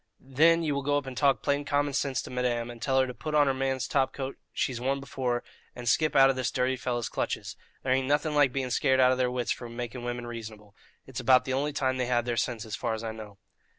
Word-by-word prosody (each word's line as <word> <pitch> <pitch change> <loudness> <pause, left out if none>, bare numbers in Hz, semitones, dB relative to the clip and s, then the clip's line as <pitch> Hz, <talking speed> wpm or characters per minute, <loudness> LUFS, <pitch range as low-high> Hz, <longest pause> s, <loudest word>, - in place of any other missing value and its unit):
Then 165 +4 +5
ye 155 - 0
will 140 0 -1
go 145 +1 +1
up 145 - -3
and 130 -1 -7
talk 140 0 +2
plain 140 0 +1
common 145 0 0
sinse 135 -1 -1
to - - -9
madame, 120 -2 -1
and 120 -1 -12
tell 135 0 +2
her 130 - +4
to 125 - -6
put 155 +4 -4
on 145 -1 +6
her 135 - +2
man's 130 -1 -1
top 135 -1 +1
coat 135 -1 -5 0.2
she's 125 -3 -2
worn 135 +2 0
before, 125 -3 -2 0.3
and 120 -1 -7
skip 155 +6 +2
out 135 0 +8
of - - -4
this 130 -2 -1
dirty 130 +1 0
fellow's 120 -2 -2
clutches. - - -3 0.3
There 130 - +2
ain't 130 0 +1
nothing 150 +2 +1
like 145 -3 +4
being 130 -1 -2
scared 130 0 +2
out 130 0 +6
of 130 - 0
their 125 -1 +2
wits 125 -1 -2
for 120 - -4
making 120 +1 -6
women 120 0 -4
reasonable 110 -3 -9 0.3
it's 135 -1 -6
about 130 0 +4
the 130 - -2
only 145 +3 0
time 130 -2 0
they 125 -1 -1
have 120 -1 +1
their 120 -1 -1
sinses, 115 -2 -2
so - - -3
far - - -1
as 110 - -7
I 110 - -3
know." 105 -2 -10
130 Hz, 265 wpm, -28 LUFS, 120-140 Hz, 0.3 s, out